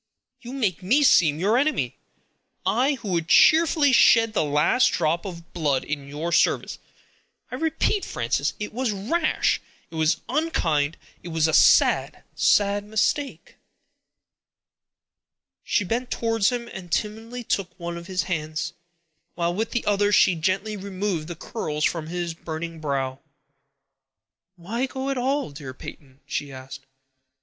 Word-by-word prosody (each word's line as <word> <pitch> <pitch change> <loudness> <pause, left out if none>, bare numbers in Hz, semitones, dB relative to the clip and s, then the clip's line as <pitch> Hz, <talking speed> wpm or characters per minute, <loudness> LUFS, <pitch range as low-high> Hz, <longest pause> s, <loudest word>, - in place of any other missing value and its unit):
You 245 +2 -8
make 210 -10 -1
me 250 +11 +3
seem 160 - +4
your 210 +7 +3
enemy; 305 +3 0 0.7
I, 270 +4 +2
who 225 -5 -7
would 170 -3 -1
cheerfully 310 - +5
shed 230 -2 +5
the - - +1
last 150 - +3
drop 170 +2 0
of 170 -2 -9
blood 145 -6 0
in 145 -2 -4
your 150 +4 -4
service. - - +1 0.7
I - - -3
repeat, 325 +5 0
Frances, - - -1
it 210 - -5
was 255 +1 -1
rash; 250 - 0 0.3
it - - -16
was 160 +1 +1
unkind; 170 - 0 0.2
it - - -10
was 160 -1 +1
a 160 - -1
sad, - - +4
sad 205 0 +2
mistake." 220 +7 -2 2.1
She 205 - +1
bent 240 +6 -2
towards 225 -3 +1
him 240 -1 -4
and 180 -3 -9
timidly 225 +3 -3
took 195 -5 -3
one 170 0 -5
of 170 +1 -8
his 185 -1 -1
hands, 155 -3 -3 0.6
while 170 0 0
with 220 +5 -2
the 240 - -2
other 205 0 +2
she 190 -2 +5
gently 190 +6 -1
removed 190 -4 -3
the 175 - -6
curls 150 -4 -4
from 165 -2 -1
his 175 0 -3
burning 165 0 -6
brow. 135 -3 -2 1.4
"Why 225 +9 -3
go 265 +1 -4
at 270 - -2
all, 270 - -1
dear 140 -2 -9
Peyton?" 135 0 -11
she 145 -1 -4
asked. 130 0 -10
185 Hz, 145 wpm, -24 LUFS, 160-235 Hz, 2.1 s, cheerfully